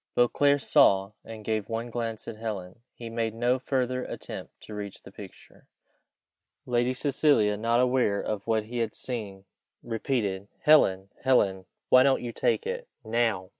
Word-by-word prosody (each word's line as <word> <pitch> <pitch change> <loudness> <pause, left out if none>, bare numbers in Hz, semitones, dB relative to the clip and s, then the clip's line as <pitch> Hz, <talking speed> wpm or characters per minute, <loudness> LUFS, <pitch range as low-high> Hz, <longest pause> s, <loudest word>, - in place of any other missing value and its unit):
Beauclerc 140 +4 +3
saw, 100 -11 +4
and 110 -2 -10
gave 110 -1 -2
one 115 +1 -3
glance 115 -2 -4
at - - -5
Helen. 105 -2 -6 0.2
He 120 - -8
made 115 -1 -2
no 120 +2 +1
further 130 -1 -1
attempt - - -8
to 110 - -10
reach 105 -1 -7
the - - -12
picture. - - -14 1.0
Lady 120 +1 +1
Cecilia, 135 -6 +2
not 115 +3 +1
aware 125 -5 +2
of 105 -1 -4
what 110 -1 +1
he 120 +3 -5
had 115 -2 -2
seen, 100 -6 -5 0.4
repeated, 110 -4 -2
"Helen! 95 -11 +4
Helen! 100 -8 +2 0.2
why 130 - +7
don't 135 -1 +3
you 120 - -4
take 465 - 0
it? - - -4 0.2
now! 110 -5 0
115 Hz, 155 wpm, -27 LUFS, 105-125 Hz, 1.0 s, why